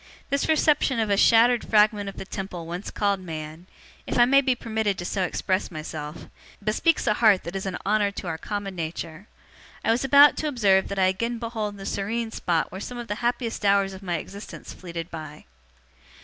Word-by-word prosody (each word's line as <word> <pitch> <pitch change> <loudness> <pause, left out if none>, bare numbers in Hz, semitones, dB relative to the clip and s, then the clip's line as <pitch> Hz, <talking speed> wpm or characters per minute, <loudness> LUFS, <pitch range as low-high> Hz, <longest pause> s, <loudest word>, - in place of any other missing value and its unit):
This 280 +2 0
reception 300 -5 +3
of 220 -2 0
a - - +4
shattered 230 +3 +5
fragment 210 -1 +3
of 195 - -11
the - - -6
Temple 190 -4 -6
once 175 +4 -5
called 200 -2 0
Man 160 -1 -7 0.4
if - - -2
I 240 - +7
may 275 +2 +5
be 260 -2 +1
permitted 220 -4 -2
so 195 - -2
to 180 - +2
express 185 +2 -1
myself 155 -2 -7 0.4
bespeaks 220 - +1
a - - +3
heart 210 -3 +4
that 170 +3 -7
is 195 0 -3
an 185 - -3
honour 205 0 +2
to 200 - -7
our 165 -2 -3
common 205 -1 -4
nature. 165 +2 -6 0.6
I - - +4
was 235 +3 +1
about 280 +2 +7
to 310 - -1
observe 200 -9 +3
that 200 - -5
I 190 - +4
again 230 +6 0
behold 225 -3 -4
the 195 - -8
serene 225 +4 -2
spot 170 -6 -1
where 190 +2 -7
some 245 - -6
of 240 -1 -7
the - - 0
happiest 240 -2 -1
hours 200 -1 +3
of 190 - -10
my 175 -3 -2
existence 200 +6 -9
fleeted 170 -1 -7
by. 155 -2 -8
200 Hz, 205 wpm, -25 LUFS, 185-230 Hz, 0.6 s, I